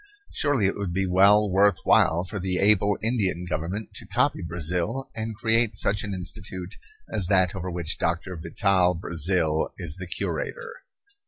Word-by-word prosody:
Surely 145 - +1
it 95 - +2
would 100 -3 -3
be 95 +2 0
well 100 +3 +5
worth 100 0 +3
while 85 +2 +4
for 100 +3 -5
the 90 0 -1
able 100 0 +3
Indian 100 -7 0
Government 90 +6 -4
to - - -7
copy - - +1
Brazil 90 - -3
and 110 0 -5
create 115 0 +1
such 100 0 0
an 105 - -4
institute 95 0 -6 0.4
as 95 - +1
that 95 -2 +3
over 95 -1 -5
which 85 -2 -3
Doctor 85 +2 -2
Vital 90 +2 +1
Brazil 80 -1 0
is 85 -3 -3
the 90 -1 -7
curator. 475 - -4
95 Hz, 160 wpm, -25 LUFS, 90-105 Hz, 0.4 s, well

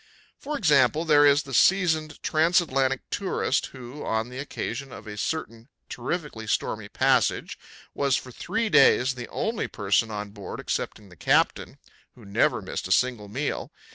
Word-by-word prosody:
For 295 +1 -4
example, 150 - +3
there 145 -2 +6
is 145 +1 +4
the 135 - -9
seasoned 160 -1 +2
trans 165 +4 +3
atlantic 135 -5 0
tourist 190 -8 0
who, 130 +2 -10
on 110 +1 -1
the 125 +1 -8
occasion 140 -1 -5
of - - -10
a 105 -1 -7
certain 115 -1 -4 0.2
terrifically 125 -4 -4
stormy - - -2
passage, - - +1 0.3
was 140 -2 +1
for 130 - -5
three 225 - -2
days 130 -7 +5
the 125 -1 -7
only 225 0 -2
person 100 +2 0
on 105 -1 -5
board 100 -1 -8
excepting 105 -3 -4
the 90 - -15
captain - - +1 0.4
who 120 - -15
never 100 - +1
missed - - -4
a - - -6
single 120 -1 +1
meal. 135 +8 -3
130 Hz, 160 wpm, -26 LUFS, 115-155 Hz, 0.4 s, there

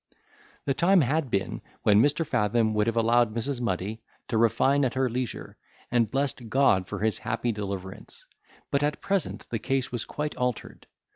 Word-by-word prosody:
The 135 - +1
time 180 +5 +4
had 145 +1 0
been 100 -3 -2 0.2
when 105 0 +5
Mr. 145 +5 +2
Fathom 110 -2 +1
would 105 +1 +1
have 115 - 0
allowed 115 -1 +3
Mrs. 125 +2 -2
Muddy 110 0 -2 0.3
to 115 - 0
refine 135 +5 +3
at 130 -1 0
her 130 0 +2
leisure, 125 0 -4 0.3
and 120 -2 +2
blessed 135 -4 -2
God 110 -7 +3
for 100 -1 -5
his 110 0 0
happy 115 +2 -1
deliverance; 100 -1 -7 0.5
but 140 - +2
at 145 0 0
present 195 -2 -2
the 115 - -1
case 135 +1 -1
was 120 -2 -3
quite 150 0 -4
altered. 125 -2 -3
120 Hz, 170 wpm, -27 LUFS, 110-135 Hz, 0.5 s, when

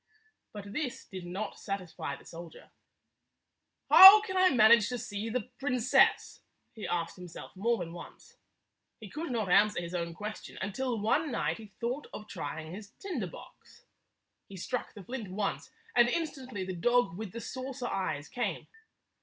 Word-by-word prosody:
But 200 -1 -9
this 285 -3 -4
did 185 -2 -8
not 195 +4 -5
satisfy 185 -7 -5
the - - -17
soldier. 170 0 -11 0.6
" - - -54
How 385 +3 +12
can 380 -3 -5
I 370 0 +5
manage 225 - +6
to 250 - -3
see 220 -2 -5
the 250 +1 -3
princess?" 255 -3 +2 0.3
he 220 - -6
asked 170 0 -2
himself 180 0 -10
more 230 +5 +1
than 170 -3 -6
once. 175 - -12 0.6
He 215 -4 -11
could 320 +2 -5
not 225 -5 -1
answer 210 +3 +4
his 170 0 -6
own 170 -1 -3
question 210 +3 -7
until 235 +4 -2
one 285 +9 +1
night 235 - -1
he 220 - -10
thought 250 +5 -3
of 215 - -8
trying 160 -4 -6
his 205 +1 -10
tinder 315 - -4
box. - - -15 0.6
He 195 - -9
struck 250 +8 -4
the 205 - -10
flint 235 -1 -6
once, 195 +1 -3 0.3
and 240 0 +6
instantly 260 - -3
the 185 - -4
dog 220 +2 +2
with 210 -1 -6
the 230 - -6
saucer 260 +1 -6
eyes 145 -9 -3
came. 245 - -3
215 Hz, 165 wpm, -30 LUFS, 185-250 Hz, 0.6 s, How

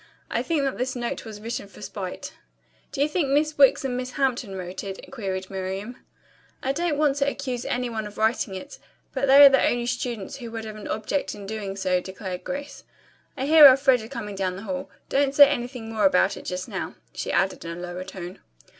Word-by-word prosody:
I - - +1
think 320 -4 0
that 270 -3 -2
this 255 +1 -1
note 240 -1 -4
was 215 -2 -8
written 225 -1 -5
for 200 - -16
spite." 190 -4 -6 0.6
"Do 275 - -3
you - - +2
think 305 -1 0
Miss 300 +2 +2
Wicks 275 0 +6
and 250 -2 -1
Miss 250 0 -4
Hampton 250 -7 -1
wrote 185 0 -6
it?" 195 -1 -8
queried 190 -6 -4
Miriam. 195 +5 -4 0.7
"I 265 - +1
don't 320 +1 -1
want 290 -2 +2
to 280 0 +2
accuse 255 -4 -4
any 250 0 -1
one 220 -2 -4
of 210 - -12
writing 220 -2 +1
it, 280 +10 -9 0.3
but 275 0 0
they 280 +2 +10
are - - +11
the 270 -1 +3
only 240 0 +1
students 240 -4 -3
who 240 -3 -7
would 225 -1 -6
have 215 -1 -7
an 215 - -8
object 220 +7 -2
in 205 - -9
doing 200 -2 -4
so," 185 -2 +1
declared 190 -1 -6
Grace. 280 +1 -6 0.5
"I 265 - -1
hear 305 0 +10
Elfreda 260 -4 +4
coming 230 -6 -6
down 190 -2 -2
the 195 - -8
hall. 275 +4 -4 0.2
Don't 275 0 +1
say 285 0 +10
anything 245 -4 -4
more 215 -2 +2
about 190 +1 +3
it - - -10
just 180 0 -4
now," - - -5 0.2
she - - -3
added 190 0 +1
in 170 0 -6
a - - -8
lower 180 +1 -5
tone. 185 -1 -8
235 Hz, 215 wpm, -25 LUFS, 195-275 Hz, 0.7 s, are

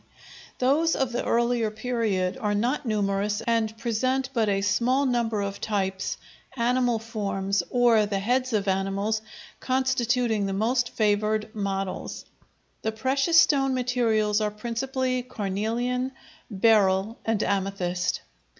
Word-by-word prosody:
Those 295 +6 +2
of 265 -2 0
the 240 - -2
earlier 235 -1 +1
period 220 -4 -1
are 210 -4 0
not 245 +6 -1
numerous 205 -1 0
and 225 -1 0
present 255 +4 -1
but 225 -3 +1
a 195 -1 +1
small 240 +7 +2
number 235 -4 0
of 200 0 -5
types, 195 -3 -2 0.4
animal 245 0 +2
forms 200 -3 -2
or 235 -4 +4
the 200 -1 -1
heads 250 +6 0
of 205 -3 0
animals 195 +3 0 0.4
constituting 245 -4 +1
the 195 - -2
most 240 +5 +1
favored 215 0 0
models. 195 -2 -4 0.6
The 220 - -1
precious 270 +8 +3
stone 270 -4 +3
materials 225 -4 +1
are 210 - +1
principally 255 +4 -2
carnelian, 240 +4 -2 0.4
beryl, 205 0 +3
and 225 -2 0
amethyst. 190 -3 -1
220 Hz, 125 wpm, -26 LUFS, 205-250 Hz, 0.6 s, or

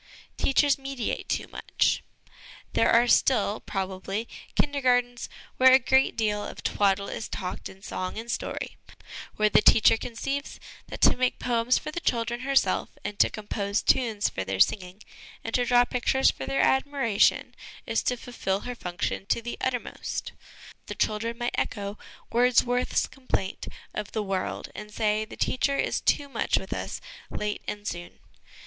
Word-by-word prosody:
Teachers 280 +1 +3
mediate 270 -3 -4
too - - -1
much. - - 0 0.7
There - - +3
are 235 +1 +5
still, 220 -4 +3
probably, 195 +3 -4 0.3
Kindergartens 245 -4 +1 0.3
where 260 0 +7
a - - +10
great 265 +1 +3
deal 210 -2 0
of - - -8
twaddle 200 -1 +1
is 220 - -5
talked 180 - -5
in 190 +1 -15
song 185 +2 -4
and 230 +1 -4
story, - - -4 0.6
where 215 - +3
the 210 - +5
teacher 220 +1 +6
conceives 275 +5 -4 0.3
that - - -8
to - - +6
make 255 0 +1
poems 240 0 +1
for 305 - -5
the 345 - -3
children 235 -5 -1
herself 270 +1 +1 0.2
and 205 - -5
to - - +5
compose 205 -1 -2
tunes 225 -5 +2
for 95 - -3
their 95 0 -3
singing 185 - +1 0.4
and 225 - -5
to 245 - +2
draw 245 0 +5
pictures 255 +2 +2
for - - -7
their 275 - +1
admiration, 265 -6 +2 0.3
is - - 0
to 250 - 0
fulfil 205 -5 -3
her 245 - -5
function 180 -2 -4
to - - +2
the 240 +1 -5
uttermost 250 -2 -3 0.6
The - - -5
children 230 +2 -1
might 240 0 -2
echo 200 -1 -3 0.3
Wordsworth's 245 +1 +3
complaint 255 -8 -4 0.3
of 210 -1 -5
'the 215 - -1
world/ 195 -2 -3
and 210 0 -8
say, 215 0 0
the 215 - -11
teacher 275 +2 +1
is - - 0
too 285 - +1
much 275 - 0
with - - -4
us, - - -5 0.3
late 210 0 -3
and 205 0 -5
soon. 175 0 -6
230 Hz, 160 wpm, -27 LUFS, 205-250 Hz, 0.7 s, a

